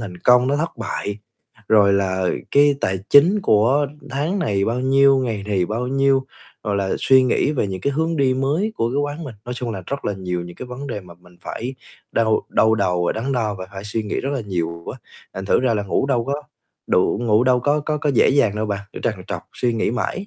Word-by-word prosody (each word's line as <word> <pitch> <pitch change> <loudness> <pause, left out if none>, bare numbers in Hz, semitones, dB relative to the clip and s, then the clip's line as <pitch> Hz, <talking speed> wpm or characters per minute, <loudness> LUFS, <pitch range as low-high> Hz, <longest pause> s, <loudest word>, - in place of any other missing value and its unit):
thành 95 -6 -7
công, 125 +4 +5
nó 145 - +1
thất 165 -2 -3
bại, 105 -1 -4 0.5
rồi 100 -2 +5
là 95 -2 0 0.2
cái 145 0 +5
tài 95 0 0
chính 180 +9 +6
của 130 - +3 0.2
tháng 155 +9 -1
này 100 - 0
bao 120 +2 -1
nhiêu, 135 +1 +4
ngày 115 -6 -2
này 95 -4 0
bao 115 +5 -2
nhiêu, 135 0 +2 0.4
rồi 105 -2 0
là 95 -1 -1
suy 130 -1 +5
nghĩ 130 +3 +1
về 130 -8 0
những 95 -1 -5
cái 140 +9 0
hướng 160 +3 0
đi 135 -3 +2
mới 150 +11 0
của 115 - 0
cái 135 - -3
quán 145 +3 -2
mình. 125 -6 -8
Nói 125 0 -5
chung 120 -1 -4
là 95 -4 -5
rất 140 0 -4
là 105 - 0
nhiều 90 -2 -3
những 85 0 -11
cái 130 - -7
vấn 125 +3 -7
đề 120 -6 -4
mà 90 -2 -14
mình 90 +1 -21
phải 125 +3 -5 0.4
đau 110 -1 +2
đau 110 0 +3
đầu 90 -4 0
và - - +1
đắn 125 +5 -3
đo, 110 -5 0
và 95 -1 -7
phải 95 +1 -8
suy 110 +2 -2
nghĩ 105 - -3
rất 135 - -3
là 135 - -2
nhiều 85 -5 -4
á, - - -6 0.4
thành 95 0 -5
thử - - +2
ra 125 -3 +2
là 105 - -1
ngủ 100 +7 0
đâu 120 -4 +1
có 140 - -1 0.5
đủ, 90 - +2
ngủ 115 +1 +3
đâu 125 -1 +3
có 145 +3 +1
có 150 +1 -2
có 145 0 0
dễ - - +5
dàng 115 -7 +2
đâu 110 0 -1
bạn, 100 -1 -2
cứ - - -8
trằn 105 -5 -2
trọc 95 -5 -4
suy 120 -1 0
nghĩ 110 - 0
mãi. 155 - -3
115 Hz, 245 wpm, -21 LUFS, 100-135 Hz, 0.5 s, chính